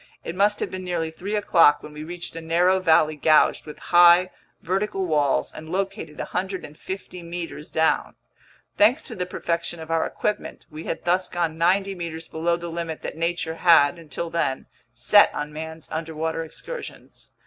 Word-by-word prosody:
It 165 - -5
must 205 +2 +2
have - - -2
been 185 0 -5
nearly 170 -3 -2
three 195 +6 -4
o'clock 170 -7 +4
when 150 - -10
we 150 0 -7
reached 175 +1 -7
a 165 - -5
narrow 175 +3 +3
valley 160 -3 +3
gouged 155 +1 +3
between 150 - -10
high, 175 +1 +7 0.3
vertical 195 +1 -1
walls 150 -5 +1
and 155 +1 -9
located 195 -4 -3
150 185 0 -5
meters 170 -3 -7
down. 160 0 +1 0.6
Thanks 240 +9 +4
to - - -7
the 180 -1 -3
perfection 170 -1 -3
of 160 0 -7
our 165 -1 +2
equipment, 210 - -4
we 155 +2 -8
had - - -4
thus 180 +2 +1
gone 170 -2 -1
ninety 195 +3 +2
meters 165 -3 -6
below 170 +2 0
the 170 0 -6
limit 165 -1 -5
that - - -5
nature 165 0 -2
had, 170 -2 +5
until 165 +1 -5
then, 150 -6 -1 0.3
set 125 - +5
on 150 0 -4
man's 160 0 -7
underwater 160 0 -3
excursions. - - -9
170 Hz, 170 wpm, -24 LUFS, 160-185 Hz, 0.6 s, high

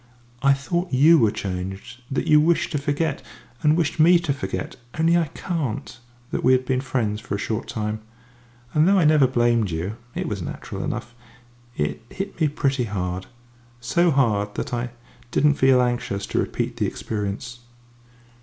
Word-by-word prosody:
I 140 +1 +5
thought 175 +6 -2
you 155 +5 +6
were 110 - +4
changed, 95 +5 -5
that 135 - -1
you 150 0 +6
wished 165 +2 +2
to 150 - 0
forget, 145 +1 -1 0.4
and 150 +1 +4
wished 160 -1 0
me 175 +3 +7
to 170 -4 -1
forget 95 -8 -4 0.2
only 165 +1 +4
I 170 -2 +2
can't 150 - -4 0.3
that - - -2
we 130 - +5
had 130 0 +2
been 130 0 0
friends 110 -6 -1
for 100 - -4
a - - -2
short 110 +2 -3
time. 110 0 -3 0.7
And 155 +2 +4
though 200 +1 +5
I 180 - +4
never 150 -3 +5
blamed 120 -4 +2
you 90 +7 -3 0.2
it - - -2
was 105 -3 -3
natural - - -6
enough 120 - -4 0.6
it 75 +3 -1
hit 195 -3 -6
me 155 - +5
pretty 135 -3 0
hard 95 -3 -3 0.5
so 150 +9 +2
hard 105 -8 +1
that - - -4
I 120 0 -1 0.4
didn't 150 +4 +3
feel 130 -2 +4
anxious 120 -5 -2
to - - -1
repeat - - -2
the - - +1
experience." 105 +3 -4
130 Hz, 175 wpm, -23 LUFS, 105-150 Hz, 0.7 s, me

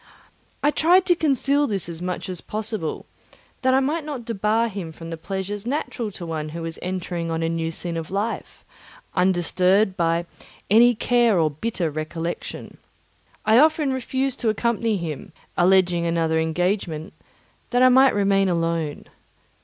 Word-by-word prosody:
I 290 - +4
tried 355 +5 +4
to 355 -2 +4
conceal 285 -2 +2
this 195 -6 -2
as 170 -1 -6
much 180 0 -3
as 180 -2 -4
possible, 215 -6 -4 0.6
that 260 -1 +3
I - - +5
might 295 +4 -1
not 285 -6 -6
debar 225 +1 +1
him 190 -6 -6
from 165 +1 -9
the - - -3
pleasures 195 +5 -5
natural 250 -4 -2
to 180 - -7
one 155 -2 -4
who 165 +2 -6
was 165 0 -5
entering 175 -2 -3
on 165 0 -1
a - - +1
new 165 -1 -1
scene 170 +1 -3
of 160 -1 -5
life, 205 +4 -4 0.5
undisturbed 185 +2 +2
by 170 -1 +1 0.5
any 240 +3 +6
care 235 -2 +3
or 155 -2 +2
bitter 170 +1 -2
recollection. 160 +3 -5 0.7
I 220 +2 +6
often 305 -2 +3
refused 260 +1 -2
to 230 - +1
accompany 225 0 0
him, 160 -5 -6 0.2
alleging 175 -1 +3
another 165 -1 +1
engagement, 165 0 -1 0.6
that 245 0 +3
I 255 - +8
might 260 0 +5
remain 195 -1 +3
alone. 165 -3 -1
190 Hz, 155 wpm, -23 LUFS, 165-235 Hz, 0.7 s, I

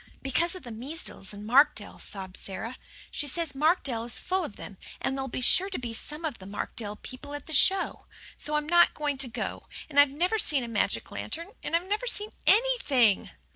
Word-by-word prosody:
"Because 325 +7 +1
of 370 - -9
the 240 - -8
measles 245 - -2
in 205 0 -7
Markdale," 240 -3 +3
sobbed 190 -2 -7
Sara. 225 +6 -5 0.3
"She 295 - -2
says 325 +1 0
Markdale 275 -6 +1
is 240 - -4
full 375 0 0
of 255 - -6
them, 195 - -10 0.2
and 265 - -1
there'll 270 0 -2
be 255 - -4
sure 370 +9 +4
to 385 - -4
be 240 -2 -5
some 300 +7 -3
of 300 -6 -3
the 190 - -10
Markdale 205 +1 -4
people 285 +6 -8
at 290 - -7
the 315 - -7
show. 380 +7 +2 0.3
So 300 - -1
I'm 300 0 0
not 345 +1 +5
to 285 -3 +1
go. 235 - -5 0.2
And 285 - +4
I've 285 -1 +8
never 355 +10 0
seen 280 -9 +4
a - - -5
magic 225 -3 0
lantern 335 +3 -4
I've 340 +2 0
never 425 +5 -1
seen 425 -3 +4 0.2
ANYTHING." 395 - +4
285 Hz, 200 wpm, -28 LUFS, 235-340 Hz, 0.3 s, I've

